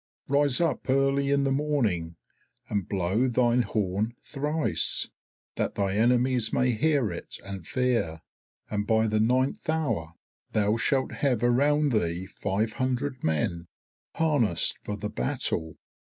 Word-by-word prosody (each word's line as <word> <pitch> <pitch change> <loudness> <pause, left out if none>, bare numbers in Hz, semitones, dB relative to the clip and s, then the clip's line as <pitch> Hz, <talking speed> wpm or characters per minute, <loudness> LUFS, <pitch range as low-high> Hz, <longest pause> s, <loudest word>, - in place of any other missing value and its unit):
Rise 140 -2 +3
up 170 -5 -1
early 135 +1 +2
in 140 0 +2
the 135 - +1
morning, 120 - 0 0.5
and 100 -4 -2
blow 100 +6 +1
thine 125 0 +3
horn 105 0 -1
thrice, 150 +2 0 0.5
that - - -1
thy 100 -1 0
enemies 120 +2 +2
may 125 -1 +2
hear 135 - +1
it 85 - -7
and 95 -4 -7
fear, 120 -11 0 0.5
and 105 -1 -2
by 110 -1 +3
the 110 -1 +1
ninth 130 +8 +1
hour 115 - -1 0.4
thou 105 0 +2
shalt 130 +3 0
have 125 -5 0
around 145 +4 +3
thee 90 -5 0
five 100 +3 -2
hundred 130 +1 -1
men 85 +2 -1 0.5
harnassed 140 - +2
for 105 - -4
the 105 +1 -4
battle. 80 +5 -1
120 Hz, 135 wpm, -27 LUFS, 100-135 Hz, 0.5 s, Rise